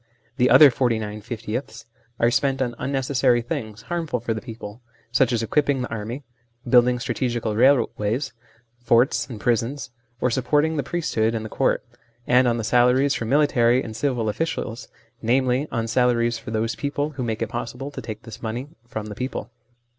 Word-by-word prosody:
The 125 -1 +4
other 150 -3 +9
forty 120 -2 +1
nine 105 -1 -5
fiftieths 115 +1 -5 0.3
are 115 +1 +3
spent 135 +3 +1
on 125 -2 -1
unnecessary 130 -2 +1
things, 110 -2 -5
harmful 165 -7 -2
for 115 - -2
the 110 - -5
people, 115 -1 -9 0.3
such 125 +1 +3
as 115 -2 0
equipping 140 +2 +1
the - - -5
army, 115 +5 -5 0.4
building 125 0 +5
strategical 120 -3 -2
railways, 120 -1 +2 0.5
forts, 120 +2 +2
and 115 -4 -7
prisons, 120 +5 -1 0.3
or 125 - +1
supporting 150 +5 +1
the 145 - 0
priesthood 120 -8 -1
and 110 -1 -3
the - - -6
court, - - 0 0.4
and 125 +1 +4
on 115 -1 0
salaries 125 +4 +3
for 115 - -3
military 130 -2 +3
and 110 -1 -7
civil 120 -2 -1
officials, 115 -1 -3 0.4
i.e. 130 +4 +2
on 115 -1 -1
salaries 120 -1 +2
for 115 - -9
those 110 +1 -1
people 145 +1 -2
who 135 -3 -5
make 115 -1 -2
it 115 - -4
possible 125 +3 -5
to - - -7
take 110 -2 -7
this 115 0 -10
money 120 +5 -4 0.2
from 110 -2 -5
the 105 - -6
people. 125 +1 -5
120 Hz, 170 wpm, -23 LUFS, 115-135 Hz, 0.5 s, other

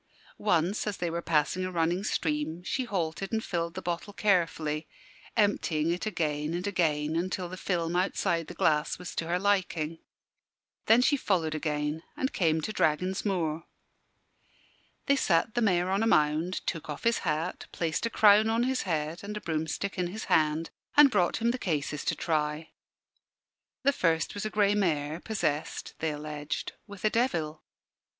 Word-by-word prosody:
Once, 185 +1 +1
as 205 - -2
they 175 -1 -2
were 170 +1 -2
passing 165 +3 +1
a 185 - -3
running 175 +2 0
stream, 160 -3 -1
she 260 +7 -1
halted 190 -3 -2
and 220 -1 0
filled 170 -1 -2
the 185 - -5
bottle 175 +4 -3
carefully, 165 -6 +1 0.5
emptying 170 -7 +2
it 180 +5 -2
again 155 -4 -1
and 180 +2 -3
again 160 -6 +1
until 180 +1 -1
the 180 - -7
film 175 -2 -1
outside 170 -2 0
the - - -8
glass 150 -1 +2
was 180 0 -7
to 165 - -3
her 175 +1 +1
liking. 180 -5 0 0.9
Then 230 +3 +6
she 285 +2 +3
followed 170 - 0
again, 150 0 -2 0.2
and 265 - -1
came 160 -3 +2
to 215 - -3
Dragon's 180 +4 +1
Moor. 165 -5 -1 1.4
They 280 - +4
sat 190 -4 +2
the 240 - 0
Mayor 185 -4 +2
on 195 +2 +1
a 225 - +2
mound, 155 +1 +2
took 165 -3 -3
off 150 - -5
his 230 0 +2
hat, 160 +1 -2
placed 165 +6 -1
a - - -4
crown 215 0 +6
on 230 +1 +2
his 260 0 0
head 155 +2 -2
and 210 +1 -5
a - - -6
broomstick 160 +5 -2
in 180 - +1
his 210 +5 -6
hand, 155 +1 +2 0.3
and 295 -2 +9
brought 180 -5 +2
him 235 +1 +2
the 250 - -4
cases 150 - -2
to - - +1
try. 155 -1 -1 1.1
The 280 +1 +4
first 165 - +1
was 205 +1 -3
a - - -4
grey 205 -1 +3
mare, 160 -6 0
possessed 170 -8 -2
(they 160 - 0
alleged) 150 0 -4 0.2
with 205 0 -7
a 215 - +3
devil. 165 -11 0
175 Hz, 170 wpm, -29 LUFS, 155-200 Hz, 1.4 s, and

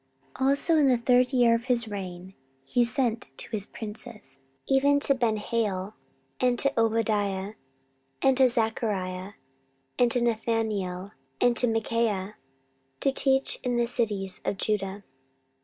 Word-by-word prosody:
14:017:007 265 - 0
Also 300 +4 +3
in 295 -2 +4
the 255 -2 +4
third 250 +2 +3
year 245 -3 +4
of 230 +1 -1
his 240 -3 0
reign 190 -2 -7 0.3
he 240 - +2
sent 235 -2 0
to - - -4
his 210 -3 0
princes, 210 - -8 0.3
even 280 +1 +3
to 280 - +2
Benhail, 215 -4 -1 0.5
and 250 -1 +2
to 275 +2 +2
Obadiah, 210 -3 0 0.7
and 265 -1 +3
to 265 -1 +6
Zechariah, 205 -5 -2 0.7
and 245 -1 +4
to 245 - +2
Nethaneel, 220 -5 -1 0.3
and 245 -1 +3
to 245 - +3
Michaiah, 225 -3 -1 0.7
to 275 - +2
teach 270 0 +1
in 250 -2 -1
the 240 0 +2
cities 210 -6 -1
of 200 - -2
Judah. 200 -1 -2
230 Hz, 140 wpm, -27 LUFS, 205-245 Hz, 0.7 s, to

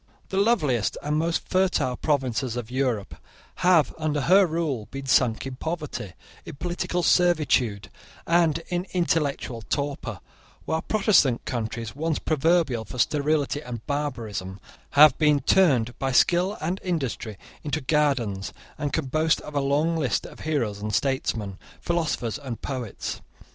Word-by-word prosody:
The 190 - -3
loveliest 170 - +2
and 150 +1 -1
most 165 +1 -1
fertile 180 -9 +1
provinces 130 -4 -1
of 120 -1 -5
Europe 125 -6 -1 0.4
have, 175 -4 +4
under 150 -2 0
her 190 +5 +5
rule, 155 -9 -2
been 135 0 -7
sunk 125 -3 +2
in 130 -1 -6
poverty, 150 - -4 0.3
in - - -9
political 175 +2 -2
servitude, 150 - +2 0.3
and 165 -1 +2
in 180 +1 -2
intellectual 150 -9 0
torpor, 140 +6 -3 0.5
while 160 0 -1
Protestant 195 - +3
countries, 115 -1 -4
once 160 +1 -1
proverbial 155 -5 +1
for 110 - -9
sterility 145 +2 +1
and 120 -5 -7
barbarism, 115 -10 -4 0.3
have 150 -1 +8
been 150 -2 +4
turned 130 -6 +3
by 135 0 0
skill 180 +9 +3
and 175 +5 -2
industry 125 - -3 0.3
into 150 +1 -1
gardens, 130 -9 0 0.3
and 145 -1 -2
can 160 - -1
boast 155 +4 +1
of 150 - -9
a 145 - +1
long 145 +4 +1
list 145 -6 0
of - - -11
heroes 115 -10 -2
and 105 -1 -2
statesmen, 115 -7 -1 0.2
philosophers 160 -9 -1
and 130 -5 -7
poets. 125 -6 -5
145 Hz, 140 wpm, -25 LUFS, 120-165 Hz, 0.5 s, have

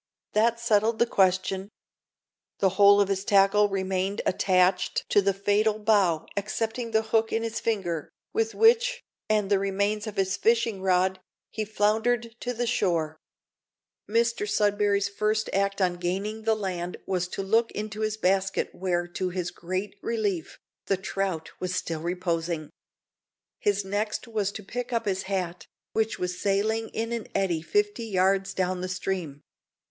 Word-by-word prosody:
That 230 +2 +3
settled 225 -1 +2
the 235 - +4
question. 190 -1 +1 0.9
The 195 - +3
whole 200 +1 +6
of 200 - +4
his 195 -1 -1
tackle 200 +1 +4
remained 190 +1 -1
attached 185 0 +2
to 205 - +5
the 195 0 +2
fatal 205 +2 +1
bough 200 -7 +2
excepting 225 +3 -2
the 220 0 +2
hook 225 0 +1
in 225 - 0
his 225 -1 -3
finger, 175 -8 -2 0.2
with 225 0 0
which, 485 +2 +4 0.3
and 210 -2 +1
the 200 - +4
remains 200 +2 -1
of 215 - -5
his 190 0 0
fishing 230 -3 +2
rod, 185 0 +2 0.3
he 220 - -2
floundered 220 +3 +1
to 245 - -3
the 240 0 -2
shore. 170 -9 0 0.9
Mr 230 -1 +1
Sudberry's 205 -1 +2
first 215 +2 -1
act 200 +1 +1
on 180 -2 +1
gaining 200 +5 -3
the 225 -1 +3
land 180 -4 -4
was 180 -2 -1
to 195 - -4
look 225 +4 +2
into 215 0 -5
his 215 0 -1
basket, 195 -1 +1
where, 175 -1 -1
to 185 +1 -2
his 180 -1 -3
great 185 +4 -4
relief, 205 -8 -2 0.3
the 195 - +2
trout 190 -3 -3
was 185 0 -2
still 165 -3 -3
reposing. 170 -2 -2 0.9
His 205 -1 +1
next 210 +4 -2
was 210 -3 -1
to 215 - -7
pick 245 +5 -5
up 230 -1 0
his 190 -2 0
hat, 175 -4 -3 0.3
which 220 -1 0
was 180 0 -3
sailing 215 +3 +1
in 225 +1 -3
an 235 -2 -3
eddy 185 -5 +1
fifty 415 - 0
yards 195 -1 +1
down 185 -1 -1
the 185 - -3
stream. 180 -6 -3
200 Hz, 155 wpm, -27 LUFS, 185-220 Hz, 0.9 s, whole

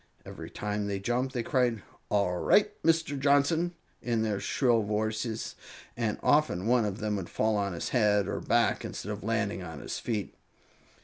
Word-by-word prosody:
Every - - -8
time 105 0 -3
they 100 -1 -1
jumped 125 +6 -1
they 120 - 0
cried: 120 -5 +1 0.3
"All 100 -4 +1
right, 205 - +4
Mr. 160 -3 +2
Johnson!" 145 +5 +3 0.3
in 115 -2 0
their 105 -3 -1
shrill 120 +3 +2
voices, 110 +2 -2 0.4
and 115 -3 -1
often 145 - +3
one 120 -1 +3
of 100 -2 -2
them 105 -2 -1
would 95 -3 -5
fall 110 0 +1
on 100 -2 0
his 85 - -3
head 105 -5 +3
or - - -2
back - - +2
instead 105 - -5
of 105 -1 -6
landing 110 -3 -1
on 80 -4 -7
his - - -5
feet. 105 -5 -3
110 Hz, 175 wpm, -29 LUFS, 100-125 Hz, 0.4 s, right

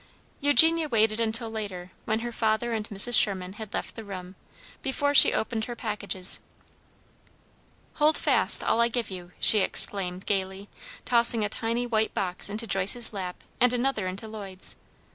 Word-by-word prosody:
Eugenia 310 +3 +3
waited 220 -2 0
until 230 +1 -1
later, 190 -5 -8
when 220 +1 -3
her 240 0 -6
father 225 +1 -2
and 220 -1 -6
Mrs. 210 +4 +3
Sherman 190 -4 +3
had 215 0 -11
left - - -6
the 225 - -10
room, 185 -3 -10 0.5
before 285 +1 -2
she - - +6
opened 220 0 -4
her 240 - -8
packages. 205 -5 0 1.6
"Hold 305 +1 +3
fast - - +5
all 230 - 0
I 235 - +2
give 235 -3 -5
you!" 180 -1 -11
she 215 - +5
exclaimed, 190 -1 -1
gaily, 195 0 -5 0.4
tossing 235 -2 +4
a - - -5
tiny 230 +3 -4
white 220 -2 -3
box 180 0 -1
into 215 +3 -5
Joyce's 205 +4 0
lap 185 -3 -8 0.2
and 250 0 +2
another 245 -5 -3
into 195 +4 -8
Lloyd's. 200 -4 +1
220 Hz, 160 wpm, -24 LUFS, 195-235 Hz, 1.6 s, she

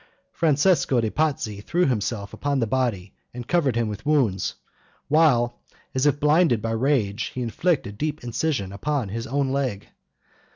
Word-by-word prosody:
Francesco 155 -3 +2
de' 110 -2 0
Pazzi 135 -10 -1
threw 175 +8 +1
himself 105 -4 -2
upon 145 -1 -1
the 120 - +1
body 110 -6 -1 0.2
and 120 -1 -7
covered 150 -9 +2
him 115 -1 +1
with 105 -1 -6
wounds; 130 - +1 0.5
while, 135 -6 +3 0.3
as 130 +2 +2
if 145 0 +2
blinded 150 -4 +3
by 115 +1 -3
rage, 115 -3 0
he 130 - -3
inflicted 125 - 0
a - - -16
deep 150 +2 -3
incision 120 -4 -2
upon 135 0 -2
his 115 +3 -4
own 135 +1 0
leg. 130 -7 -2
130 Hz, 160 wpm, -24 LUFS, 110-150 Hz, 0.5 s, while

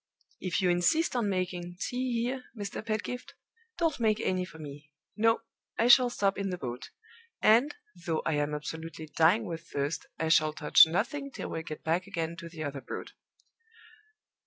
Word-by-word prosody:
"If 185 +1 -1
you 180 - +4
insist 255 - +2
on 230 -4 +1
making 180 -2 -3
tea 245 0 -1
here, 255 +1 -3
Mr. 205 0 -5
Pedgift, 225 +3 -4 0.4
don't 325 -6 +1
make 220 -2 +2
any 185 -3 0
for 170 - -13
me. 150 -1 -10 0.3
No! 225 +1 +3 0.4
I 235 - +3
shall 245 0 +8
stop 200 -4 0
in 195 0 -1
the 180 - -3
boat; 125 -4 -6 0.5
and, 235 +7 +4 0.3
though 160 -2 0
I 160 - +1
am 145 0 0
absolutely 160 +1 -6
dying 180 +8 +4
with 170 -2 -6
thirst, 140 +2 -2
I 160 - -1
shall 155 -1 +4
touch 150 +1 +7
nothing 245 - -1
till - - -6
we 160 - -3
get 155 -1 -8
back 170 +4 0
again 170 -4 -3
to 170 -1 -8
the 160 -2 -6
other 140 -2 -4
Broad!" - - -7
180 Hz, 175 wpm, -30 LUFS, 160-225 Hz, 0.5 s, shall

